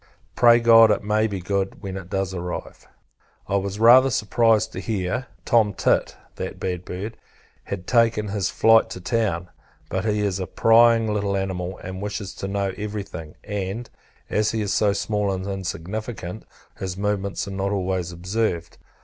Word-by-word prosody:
Pray 120 -1 +6
God 115 -1 +7
it 105 - +1
may 105 +1 +2
be 100 -3 -4
good, 95 +2 -2
when 95 -1 -5
it 95 -2 -7
does 95 -1 -2
arrive. 90 -1 -6 0.6
I 100 - +1
was 100 +1 -3
rather 125 +4 +7
surprised 110 -1 +2
to - - -5
hear 100 +4 -2 0.2
Tom 110 -4 +3
Tit - - +1 0.2
(that - - -5
bad 90 -1 -3
bird) 105 +5 -6 0.5
had 95 -2 -5
taken 115 -3 +2
his 100 -2 -1
flight 115 0 +4
to - - -7
town: 90 -4 -1 0.4
but, - - -1
he 105 -1 0
is 100 -2 -1
a 95 - -3
prying 115 -1 +4
little 100 -1 0
animal, 95 -1 -3
and 95 +1 -6
wishes 105 -1 -4
to 95 - -4
know 100 -1 -1
every 105 0 -4
thing; 80 -5 -9
and, 105 +3 -4 0.4
as 105 0 +1
he 110 - -1
is 100 -2 -1
so 105 -1 +3
small 105 0 -1
and 95 0 -3
insignificant, 95 +1 -5 0.3
his 95 -1 -4
movements 100 -1 -2
are - - -5
not 95 0 -2
always 95 -3 -1
observed. 90 0 -2
100 Hz, 170 wpm, -23 LUFS, 95-110 Hz, 0.6 s, God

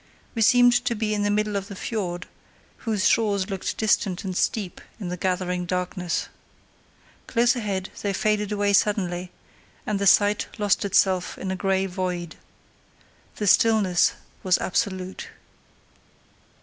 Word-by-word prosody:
We 230 - -2
seemed 245 +1 +6
to 235 - 0
be 215 -1 -1
in 205 - -1
the 205 - +1
middle 210 0 0
of 195 -1 -2
the 200 - -8
fiord, 180 -4 -4 0.6
whose 210 -3 +2
shores 205 -3 +1
looked 190 -1 -3
distant 210 -3 +1
and 185 -2 -4
steep 195 -1 -1 0.2
in 190 -5 -5
the 180 - -3
gathering 180 0 -2
darkness. 180 -1 -2 1.0
Close 240 0 +3
ahead 200 -5 -3
they 200 - -1
faded 210 +1 0
away 205 -1 +1
suddenly, 185 -3 +1 0.6
and 210 -2 -1
the 200 - +1
sight 205 +2 +4
lost 205 -2 +1
itself 190 -2 +2
in 190 - -4
a - - -1
grey 190 0 0
void. 180 -3 -4 1.0
The 210 - -3
stillness 205 -3 +4 0.3
was 185 -1 +3
absolute. 190 -1 -2
195 Hz, 140 wpm, -24 LUFS, 185-210 Hz, 1.0 s, seemed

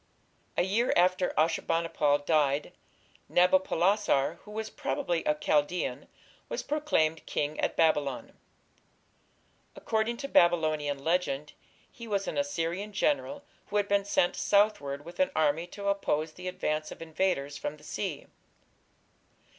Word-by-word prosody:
A - - +4
year 215 +7 +1
after 180 +1 +3
Ashur 165 +2 +2
bani 165 0 0
pal 145 -3 +2
died, 145 -1 +1 0.6
Nabopolassar, 180 -3 +2
who - - -13
was 220 +1 -5
probably 275 - -2
a 150 - +2
Chaldaean, 145 -2 0 0.4
was - - -3
proclaimed 225 - 0
king 150 +1 -2
at - - 0
Babylon. 145 -5 +1 1.4
According 225 +2 -1
to 275 - -5
Babylonian 155 - +2
legend 160 -4 -1 0.4
he 235 -1 -10
was 200 -2 -1
an - - -3
Assyrian 195 -7 -2
general 285 +5 0 0.2
who 210 - -1
had 205 -1 +1
been 200 0 +2
sent 180 -3 +2
southward 200 -9 +1
with 170 +8 -11
an 280 - +3
army 155 +2 +1
to 200 +2 -7
oppose 160 -6 0
the 180 +2 -8
advance 155 -4 -2
of - - -8
invaders 155 -4 -1
from 150 - -4
the 150 - -19
sea. 165 -1 -4
175 Hz, 135 wpm, -29 LUFS, 150-200 Hz, 1.4 s, A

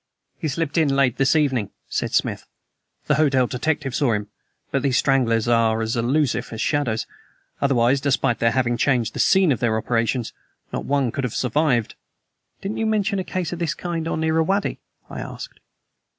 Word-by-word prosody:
"He 160 - -2
slipped 155 +1 -1
in 155 -3 +3
late 135 -4 +2
this 135 +2 +3
evening," 130 -9 +1 0.2
said - - -2
Smith. - - -1 0.6
"The 150 - +2
hotel 135 -4 +3
detective 135 +1 -2
saw 140 -5 +2
him, 105 -1 -3 0.4
but 135 - +1
these 135 -2 +1
stranglers 120 -5 +2
are 115 -1 +3
as 110 +1 -1
elusive 125 +1 0
as 110 - -6
shadows, 125 -7 0 0.6
otherwise, 135 -1 +3
despite 135 -3 +1
their 115 - +3
having 120 0 0
changed 120 -5 +1
the - - -6
scene 190 -4 +4
of 125 - 0
their 115 -2 +1
operations, 115 +1 -1 0.4
not - - -3
one 140 -4 +1
could 140 - -3
have 125 - -3
survived." 125 -2 +1 0.7
"Didn't 200 +2 -4
you 225 - 0
mention 210 -2 +1
a - - -1
case 180 -2 -3
of 175 - -6
this 165 -3 -1
kind 170 -2 -3
on 160 - -2
the 160 - +1
Irrawaddy?" 160 +6 +1 0.3
I - - -7
asked. - - -8
135 Hz, 180 wpm, -22 LUFS, 120-160 Hz, 0.7 s, scene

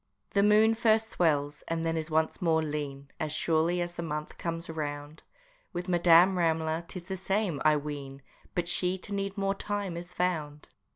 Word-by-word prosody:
The 200 - +3
moon 210 +2 +5
first 220 -1 +2
swells, 145 -4 +1
and 165 0 -2
then 165 0 0
is 160 0 -3
once 160 +4 0
more 160 -2 +2
lean, 140 -2 -5
As 155 - -2
surely 165 +3 +1
as 175 0 -3
the 170 - -5
month 150 -2 -5
comes 165 0 -3
round; 150 -1 -5 0.5
With 175 +1 -4
Madame 175 +1 +5
Ramler 160 0 0
'tis 180 -1 -7
the 190 0 -3
same, 190 -5 -1
I 155 -1 +5
ween 140 -2 -6 0.3
But 175 -1 0
she 180 +1 +1
to 200 +2 -8
need 195 0 -3
more 195 0 +1
time 200 -2 -3
is 175 +1 -7
found! 155 -5 -2
170 Hz, 180 wpm, -29 LUFS, 155-185 Hz, 0.5 s, moon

